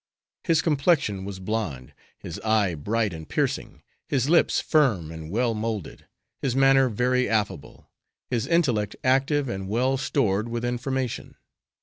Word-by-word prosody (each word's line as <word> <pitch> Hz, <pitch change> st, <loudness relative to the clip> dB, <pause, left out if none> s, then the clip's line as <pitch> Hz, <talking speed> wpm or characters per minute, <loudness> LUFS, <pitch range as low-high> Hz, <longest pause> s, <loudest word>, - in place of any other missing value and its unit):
His 165 Hz, -2 st, +3 dB
complexion 140 Hz, -, +1 dB
was 100 Hz, -1 st, -6 dB
blonde, 90 Hz, -, -4 dB, 0.2 s
his 85 Hz, -, -7 dB
eye 110 Hz, -4 st, +2 dB
bright 105 Hz, +6 st, -1 dB
and 80 Hz, -1 st, -9 dB
piercing, -, -, -2 dB, 0.3 s
his 135 Hz, -2 st, +1 dB
lips 170 Hz, -, +4 dB
firm 110 Hz, -, +2 dB
and 80 Hz, -1 st, -8 dB
well 115 Hz, +4 st, +1 dB
moulded; 110 Hz, -5 st, -4 dB, 0.3 s
his 130 Hz, -3 st, -1 dB
manner 135 Hz, -1 st, +5 dB
very 125 Hz, +3 st, +1 dB
affable; 105 Hz, -9 st, -2 dB, 0.4 s
his 120 Hz, -3 st, -1 dB
intellect 125 Hz, -, +1 dB
active 135 Hz, +2 st, +2 dB
and 95 Hz, -5 st, -4 dB
well 130 Hz, +5 st, +1 dB
stored 115 Hz, -6 st, 0 dB
with 120 Hz, 0 st, -3 dB
information. 125 Hz, +1 st, -3 dB
115 Hz, 135 wpm, -25 LUFS, 100-135 Hz, 0.4 s, manner